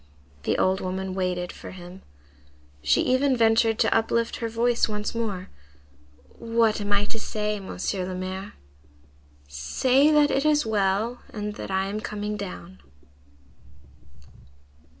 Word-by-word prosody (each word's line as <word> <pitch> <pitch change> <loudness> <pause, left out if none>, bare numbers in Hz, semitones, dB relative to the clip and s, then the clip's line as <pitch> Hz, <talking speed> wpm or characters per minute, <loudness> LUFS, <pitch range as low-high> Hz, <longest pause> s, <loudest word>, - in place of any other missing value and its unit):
The - - +1
old 190 +1 +2
woman 185 0 -3
waited 180 -1 -1
for - - -10
him. 180 +1 -10 0.8
She 75 0 +3
even 260 0 +2
ventured 225 -1 +4
to - - +3
uplift 230 +1 +1
her 230 - -3
voice 235 +1 +2
once 210 0 -3
more:— 205 -5 -3 0.9
"What 230 -2 +2
am 205 0 -3
I 205 0 +3
to 225 - -5
say, 210 -1 -2
Monsieur 190 -1 -3
le 185 - -4
Maire?" 185 +2 -5 0.9
"Say 250 - +2
that 295 -1 +5
it 275 - +1
is 300 -1 +3
well, 215 +3 0
and 210 -1 -4
that - - -7
I 190 0 +1
am 200 +2 -3
coming 210 0 -4
down." 95 - -7
210 Hz, 135 wpm, -25 LUFS, 190-230 Hz, 0.9 s, that